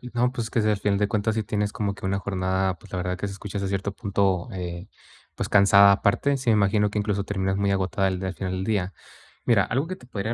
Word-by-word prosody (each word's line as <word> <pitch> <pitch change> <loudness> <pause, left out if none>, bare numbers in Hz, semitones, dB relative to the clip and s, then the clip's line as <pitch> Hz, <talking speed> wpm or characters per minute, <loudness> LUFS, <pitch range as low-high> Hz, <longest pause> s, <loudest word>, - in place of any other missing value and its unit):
Y 125 - -9
no, 125 +1 +2
pues, 120 -3 -4
que 115 - +1
si, 110 - +1
al 105 - +2
final 100 0 +1
de 105 0 +1
cuentas, 110 0 0
sí 110 - 0
tienes 105 -1 -2
como 100 -2 -2
que 95 - -6
una 100 +1 0
jornada, 95 -1 -1
pues, - - -17
la 90 - -2
verdad 90 0 -2
que 100 - -3
se 100 - -5
escucha 100 +1 -6
hasta 100 -1 -2
cierto 100 +1 -2
punto, 100 -3 0
eh, 90 -1 -6 0.5
pues - - -3
cansada, 100 0 +7
aparte, 100 +8 +2
sí, 130 -3 0
me - - +5
imagino 105 0 +2
que 105 - -2
incluso 100 -1 -1
terminas 95 -1 -1
muy 100 0 +1
agotada 95 0 0
al 95 -1 -2
d 95 - -3
al 95 - -4
final 95 0 -4
del 95 0 -2
día. 95 -3 -1 0.5
Mira, 115 -5 +4
algo 135 +7 -1
que 185 - -4
te - - -16
podría 110 -1 -3
100 Hz, 275 wpm, -25 LUFS, 95-105 Hz, 0.5 s, cansada